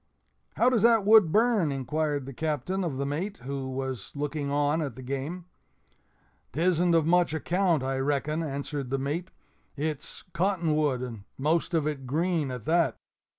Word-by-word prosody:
"How 250 - +4
does 235 -5 +2
that 225 -2 +5
wood 210 -6 +7
burn?" 215 -7 +3
inquired 145 +1 -1
the 135 - -7
Captain 160 +6 -2
of 155 -7 -2
the 140 - -1
mate, 170 +9 -3
who 135 0 -4
was 130 -5 -4
looking 145 0 -2
on 145 +2 +1
at 140 -7 -4
the 130 - -9
game. 140 +7 -4 1.1
"'Tisn't 175 +2 +2
of 165 -2 +3
much 175 -1 +3
account, 170 -2 +1
I 135 0 -1
reckon," 145 +3 0
answered 140 -2 -4
the 135 - 0
mate; 150 +7 -3 0.5
"it's 150 0 -4
cotton 175 -3 +1
wood, 145 -5 +1
and 115 -5 -7
most 160 +5 +1
of 160 -3 +1
it 140 -4 -3
green 160 +1 0
at 125 -4 -6
that." 170 0 +2
150 Hz, 165 wpm, -28 LUFS, 135-170 Hz, 1.1 s, wood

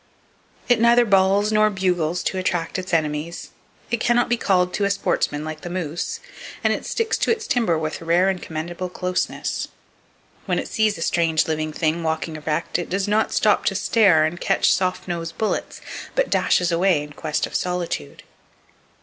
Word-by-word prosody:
It 245 -2 +4
neither 235 +1 +5
bawls 200 +1 +3
nor 215 0 +4
bugles 180 -4 0
to 190 - -1
attract 175 -1 -1
its 185 0 -6
enemies, 155 +1 -2 0.4
it 235 - +1
can 240 +2 +2
not 240 - +2
be 240 - +3
called 180 -5 +1
to 205 - -1
a - - +1
sportsman, 155 -6 -1
like 155 0 -6
the 175 - -6
moose, 175 -2 -3 0.4
and - - +3
it - - -5
sticks 455 -2 -1
to - - 0
its 450 -1 -1
timber 225 -10 +1
with 155 0 -3
rare 170 +3 +3
and 190 -2 -1
commendable 170 +3 -5
closeness. 180 0 -2 0.8
When - - +1
it - - -2
sees 215 -2 +1
a 165 - -3
strange 165 -3 +1
living 155 -1 -1
thing 160 +2 -1
walking 160 0 -2
erect, 155 +3 -2
it 175 - -5
does 195 +2 -1
not 215 +1 +1
stop 210 -1 +3
to 195 - +1
stare 190 -6 +4
and 170 +2 -4
catch - - +3
soft 185 0 -1
nosed 165 -2 -4
bullets, 220 - -2 0.3
but - - +1
dashes 180 -1 +2
away 170 -3 +2
in 150 0 -11
quest 150 +1 -2
of - - -11
solitude. 175 - -3
180 Hz, 185 wpm, -22 LUFS, 160-200 Hz, 0.8 s, neither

